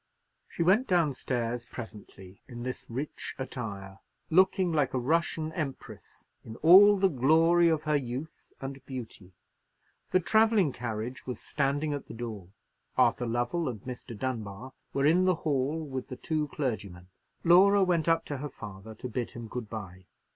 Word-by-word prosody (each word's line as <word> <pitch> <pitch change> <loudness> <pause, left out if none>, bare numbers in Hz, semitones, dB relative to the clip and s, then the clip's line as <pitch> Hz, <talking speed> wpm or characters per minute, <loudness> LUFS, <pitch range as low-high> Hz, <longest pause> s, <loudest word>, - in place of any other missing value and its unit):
She 170 - -2
went 200 +9 +4
down 170 -6 +2
stairs 120 -2 -2
presently 100 -5 -10
in 120 -2 -8
this 125 0 -6
rich 135 +6 -5
attire, 100 -7 -6 0.3
looking 185 +1 +4
like 145 -4 +1
a - - +1
Russian 160 +3 0
empress, 150 -7 -7 0.2
in 110 - -9
all 200 +5 +9
the 195 0 +4
glory 165 +4 +4
of 160 -1 0
her 155 -1 +1
youth 135 +4 -6
and 135 0 -7
beauty. 110 -8 -8 0.8
The 185 - +3
travelling 220 -3 +3
carriage 120 +1 -5
was 125 -3 -4
standing 145 +1 -1
at 145 - -5
the - - -9
door; 110 -6 -6 0.5
Arthur 120 - +3
Lovell 120 +7 -1
and 110 -5 -6
Mr. 125 -2 -8
Dunbar 120 0 -5 0.2
were 140 0 0
in 175 +5 +4
the 185 -1 +3
hall 145 +1 0
with 130 -3 -5
the 130 - -7
two 155 -2 -1
clergymen. 100 -11 -4 0.3
Laura 195 +4 +6
went 170 -3 +1
up 165 0 +2
to 145 - -4
her 145 +2 -5
father 105 -2 -10
to 125 - -6
bid 120 0 -3
him 120 -1 -8
good 115 -1 -6
bye. 95 -4 -8
135 Hz, 160 wpm, -29 LUFS, 115-165 Hz, 0.8 s, all